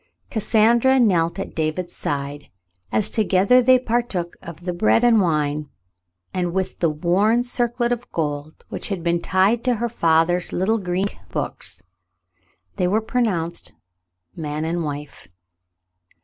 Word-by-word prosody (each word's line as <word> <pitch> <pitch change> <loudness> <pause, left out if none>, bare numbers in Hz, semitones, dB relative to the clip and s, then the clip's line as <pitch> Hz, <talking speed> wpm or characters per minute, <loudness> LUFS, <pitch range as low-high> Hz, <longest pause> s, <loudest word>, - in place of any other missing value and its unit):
Cassandra 235 +4 +3
knelt 175 -8 +2
at 195 - -5
David's 160 +3 -2
side, 145 0 -4 0.4
as 215 - +3
together 210 +3 +3
they 255 +1 +6
partook 235 -8 -2
of 170 0 -10
the 180 0 -3
bread 215 +6 +3
and 230 -3 +5
wine, 150 -3 0 0.6
and 175 -2 -1
with 190 0 -2
the 165 - +2
worn 185 +10 +2
circlet 240 -1 -1
of 245 0 -3
gold 150 -1 -4
which - - -4
had 190 -5 -3
been 170 0 +1
tied 195 +7 +2
to 250 -2 +2
her 235 +2 -2
father's 170 -3 +2
little 215 +5 +1
Greek 185 +1 -2
books, - - -4 0.9
they 180 - +1
were 205 +4 +2
pronounced 205 -8 -2 0.6
man 150 0 -3
and 170 +1 -1
wife. 145 - -6
185 Hz, 135 wpm, -22 LUFS, 165-225 Hz, 0.9 s, they